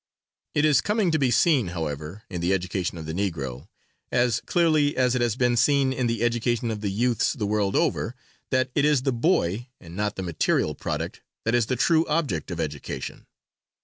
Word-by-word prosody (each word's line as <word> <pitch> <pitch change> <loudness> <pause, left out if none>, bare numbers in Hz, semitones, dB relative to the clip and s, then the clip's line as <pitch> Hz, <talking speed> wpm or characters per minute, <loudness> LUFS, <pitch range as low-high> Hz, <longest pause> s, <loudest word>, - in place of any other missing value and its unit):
It 150 0 +3
is 145 -4 +4
coming 210 -4 +1
to 155 - +1
be 135 -2 +2
seen, 125 - +3
however, 80 +3 -5
in 90 -3 -5
the 90 +3 +2
education 90 -1 -2
of 80 - -7
the 80 - -4
Negro, 80 -7 -3 0.4
as 120 -1 +2
clearly 155 -4 +2
as 125 -1 +3
it 125 - 0
has 120 -3 +1
been 125 -1 +2
seen 135 +2 +3
in 125 -2 0
the 115 -1 -1
education 120 0 0
of 105 -1 -4
the 105 - -1
youths 115 +3 +1
the 120 -9 -3
world 100 -1 0
over, - - 0 0.3
that 130 0 +1
it 145 - +2
is 145 -3 +3
the 135 -2 +1
boy 120 - +1
and 85 -1 -12
not 105 +1 -1
the 95 - -4
material 85 -3 0
product, - - -4 0.2
that 115 - +1
is 120 -3 +2
the 130 - 0
true 160 +6 +3
object 150 - -1
of 85 -2 -5
education. 75 -3 -5
115 Hz, 200 wpm, -25 LUFS, 95-130 Hz, 0.4 s, is